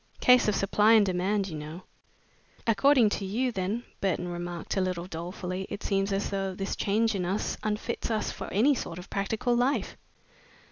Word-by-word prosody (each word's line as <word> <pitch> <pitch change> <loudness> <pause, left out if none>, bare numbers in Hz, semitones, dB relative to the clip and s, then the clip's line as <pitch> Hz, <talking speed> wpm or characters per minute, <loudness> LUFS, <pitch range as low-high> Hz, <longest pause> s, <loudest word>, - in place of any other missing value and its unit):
Case 250 -2 +6
of 210 - +2
supply 210 +3 +4
and 215 -2 +6
demand, 190 +2 0
you 165 - -6
know." 155 +4 -7 0.8
"According 240 +1 +5
to 205 - -2
you, 235 +7 0
then," 200 +3 -2 0.2
Burton 180 -2 -1
remarked, 175 0 -4
a 195 - +2
little 180 -2 -2
dolefully, 180 +2 -5
"it - - -6
seems 195 0 0
as 195 +1 -1
though 195 -1 -2
this 195 +1 -3
change 220 +3 +1
in 190 -3 -1
us 190 +4 -1
unfits 215 +3 -2
us 220 -2 -1
for - - -7
any 245 +9 +4
sort 175 -9 -5
of 180 +1 -10
practical 220 +5 0
life." 250 +4 0
195 Hz, 180 wpm, -28 LUFS, 185-220 Hz, 0.8 s, Case